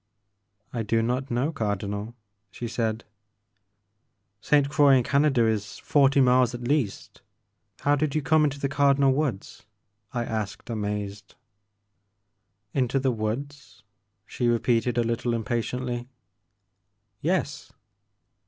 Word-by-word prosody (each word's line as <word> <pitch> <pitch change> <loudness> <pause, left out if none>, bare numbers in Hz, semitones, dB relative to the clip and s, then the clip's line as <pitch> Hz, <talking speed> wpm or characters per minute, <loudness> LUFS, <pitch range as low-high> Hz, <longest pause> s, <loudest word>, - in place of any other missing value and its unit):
I 120 - -2
do 115 +1 +1
not 130 +3 -1
know 125 +6 0
Cardinal," 105 -2 -3 0.3
she 120 +4 -6
said. 115 -1 -2 0.7
*' 100 -1 -50
Ste. 145 -2 +3
Croix 140 -1 +5
in 125 - +3
Canada 140 -3 +3
is 105 -3 -1
forty 140 -1 +3
miles 125 -1 +4
at 120 - -7
least, 135 -8 -2 0.3
— - - -49
how 145 0 +3
did 145 0 -1
you 155 - 0
come 155 +4 +4
into 145 -1 0
the 140 - 0
Cardinal 140 -1 +3
Woods? 135 -9 -3 0.2
" 100 +1 -51
I 120 -1 -2
asked 110 +1 -4
amazed. 105 -2 -4 1.4
Into 130 0 +1
the 135 -1 +1
woods?" 130 +6 -5 0.4
she 120 +2 -2
repeated 120 0 +1
a 120 - +3
little 115 +1 -1
im 115 - -2
patiently. 120 +2 -3 1.1
'*Yes." 160 -3 -1
120 Hz, 130 wpm, -26 LUFS, 110-140 Hz, 1.4 s, Croix